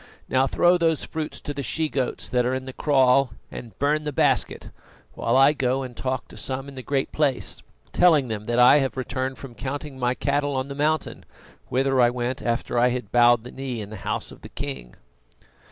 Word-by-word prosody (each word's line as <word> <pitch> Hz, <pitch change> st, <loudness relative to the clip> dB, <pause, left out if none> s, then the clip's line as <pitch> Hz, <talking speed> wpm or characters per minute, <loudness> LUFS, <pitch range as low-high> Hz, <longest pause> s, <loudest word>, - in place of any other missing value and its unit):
Now 130 Hz, +1 st, +2 dB
throw 175 Hz, +5 st, +3 dB
those 165 Hz, -2 st, +1 dB
fruits 160 Hz, -1 st, -5 dB
to 145 Hz, -, -5 dB
the 140 Hz, -, -4 dB
she 155 Hz, +5 st, -1 dB
goats 135 Hz, -4 st, -2 dB
that 125 Hz, -1 st, +1 dB
are 125 Hz, +2 st, 0 dB
in 130 Hz, 0 st, -4 dB
the 130 Hz, -, -7 dB
kraal, 135 Hz, -3 st, +3 dB, 0.2 s
and 115 Hz, -2 st, -9 dB
burn 150 Hz, +2 st, +1 dB
the 150 Hz, -, -3 dB
basket, 135 Hz, -, 0 dB, 0.4 s
while -, -, +1 dB
I 135 Hz, +2 st, +6 dB
go 135 Hz, -1 st, 0 dB
and 125 Hz, -2 st, -8 dB
talk 130 Hz, 0 st, -3 dB
to -, -, -12 dB
some 135 Hz, +1 st, -4 dB
in 140 Hz, -, -9 dB
the 130 Hz, -, -7 dB
Great 135 Hz, +1 st, -1 dB
Place, 140 Hz, -5 st, -1 dB, 0.3 s
telling 160 Hz, -7 st, +4 dB
them 110 Hz, -2 st, -4 dB
that 120 Hz, +1 st, -1 dB
I 125 Hz, +3 st, +7 dB
have 135 Hz, -1 st, -2 dB
returned 130 Hz, +1 st, -3 dB
from 135 Hz, -3 st, -10 dB
counting 135 Hz, +2 st, -6 dB
my 125 Hz, 0 st, +1 dB
cattle 145 Hz, 0 st, 0 dB
on 130 Hz, +1 st, -2 dB
the -, -, -4 dB
mountain, 150 Hz, +2 st, -1 dB, 0.5 s
whither 135 Hz, 0 st, +2 dB
I 120 Hz, -, +5 dB
went 125 Hz, +2 st, -3 dB
after 120 Hz, 0 st, -1 dB
I 125 Hz, -, +5 dB
had 125 Hz, -4 st, -3 dB
bowed 120 Hz, -1 st, +5 dB
the 125 Hz, -, -9 dB
knee 130 Hz, -3 st, -5 dB
in 105 Hz, -1 st, -7 dB
the 110 Hz, -, -7 dB
house 100 Hz, +1 st, -3 dB
of -, -, -14 dB
the -, -, -10 dB
king." 135 Hz, -, -6 dB
130 Hz, 215 wpm, -24 LUFS, 125-140 Hz, 0.5 s, I